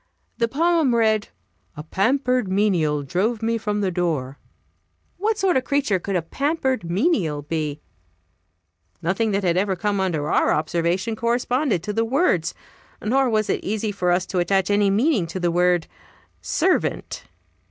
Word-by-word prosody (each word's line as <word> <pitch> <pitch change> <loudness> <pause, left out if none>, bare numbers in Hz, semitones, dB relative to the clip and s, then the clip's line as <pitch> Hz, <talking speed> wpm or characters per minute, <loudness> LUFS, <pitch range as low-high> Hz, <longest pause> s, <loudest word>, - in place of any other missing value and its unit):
The 230 - +2
poem 315 -1 +2
read: 220 -2 +2 0.5
"A 150 - -6
pampered 250 - +1
menial 180 -7 +1
drove 210 - -1
me 230 0 0
from 210 -1 -2
the 190 -2 0
door." 155 -7 -2 0.8
What 425 +3 0
sort 380 -7 +2
of 260 - 0
creature 275 -9 +1
could 195 +2 -3
a 175 - 0
"pampered 265 - -1
menial" 175 - 0
be? 150 -1 -3 1.2
Nothing 190 +6 0
that 200 -1 0
had 175 -1 +1
ever 195 0 +1
come 200 +3 -1
under 165 -6 -1
our - - +3
observation 170 +7 -1
corresponded 240 - 0
to 210 - -3
the 225 +2 +1
words. 230 - +1 0.4
Nor 260 +4 +1
was 215 -2 +1
it - - -1
easy 215 +1 -2
for 185 -3 -1
us 180 +1 +1
to 185 0 -2
attach 190 +3 +1
any 205 0 +3
meaning 215 - +2
to 185 - -5
the 175 -1 +1
word 175 -1 +2 0.6
"servant." 365 +3 -1
200 Hz, 155 wpm, -22 LUFS, 175-240 Hz, 1.2 s, our